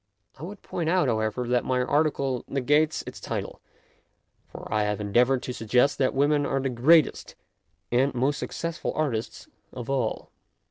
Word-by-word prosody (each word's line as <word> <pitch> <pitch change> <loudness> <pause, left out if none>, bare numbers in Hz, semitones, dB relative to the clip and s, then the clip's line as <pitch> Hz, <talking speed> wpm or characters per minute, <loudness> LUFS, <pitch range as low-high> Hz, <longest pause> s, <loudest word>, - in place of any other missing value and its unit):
I - - -12
would 190 +5 -8
point 165 -2 -3
out, 180 +1 +2
however, 110 +2 -1
that 125 0 +1
my 130 -1 0
article 140 -3 0
negates 145 +4 +1
its - - -8
title, - - -5 0.9
for - - -10
I 110 - +2
have 105 0 -1
endeavoured 120 +5 +2
to 125 - -4
suggest 125 +3 +1
that 130 -1 +1
women 145 +1 +3
are 135 -1 0
the 135 0 -1
greatest 140 +6 +3 0.6
and 130 +4 +3
most 135 +4 0
suc - - -4
cessful 170 0 -4
artists 125 -8 -3 0.2
of 125 +1 -6
all. 130 -5 -2
135 Hz, 165 wpm, -26 LUFS, 120-150 Hz, 0.9 s, women